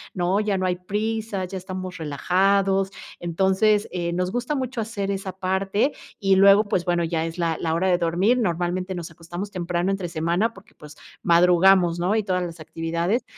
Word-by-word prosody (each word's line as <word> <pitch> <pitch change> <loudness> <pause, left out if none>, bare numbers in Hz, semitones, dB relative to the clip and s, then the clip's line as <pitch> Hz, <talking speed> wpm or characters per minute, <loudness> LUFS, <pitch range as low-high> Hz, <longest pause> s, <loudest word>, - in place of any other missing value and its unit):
¿no?, 180 +2 +1
ya 210 -2 0
no 185 - -1
hay 180 -1 0
prisa, 210 +1 -3
ya 185 - -8
estamos 185 0 -6
relajados, 190 +6 +1 0.3
entonces, 190 +5 +2
eh, 175 -1 -2
nos 180 +1 -1
gusta 245 +6 -2
mucho 260 -3 -3
hacer 205 -3 -3
esa 195 -1 -4
parte 195 +7 0 0.3
y 195 -1 +3
luego, 200 +2 +6
pues, 185 -3 0
bueno, 175 -1 +1
ya 165 -1 -1
es 165 +1 -6
la 165 -2 -1
la 160 -1 0
hora 185 +3 +1
de 175 -1 +3
dormir, 185 +9 +2
normalmente, 180 -1 -1
nos 170 -2 -6
acostamos 175 +5 -7
temprano 175 0 -1
entre 195 -3 -3
semana, 170 +7 0
porque, 190 - -17
pues, 150 0 -14 0.2
madrugamos, 175 0 +4
¿no?, 180 +5 +1
y 220 - +1
todas 185 -2 0
las 170 -1 -6
actividades. 170 - -2
185 Hz, 185 wpm, -23 LUFS, 175-200 Hz, 0.3 s, luego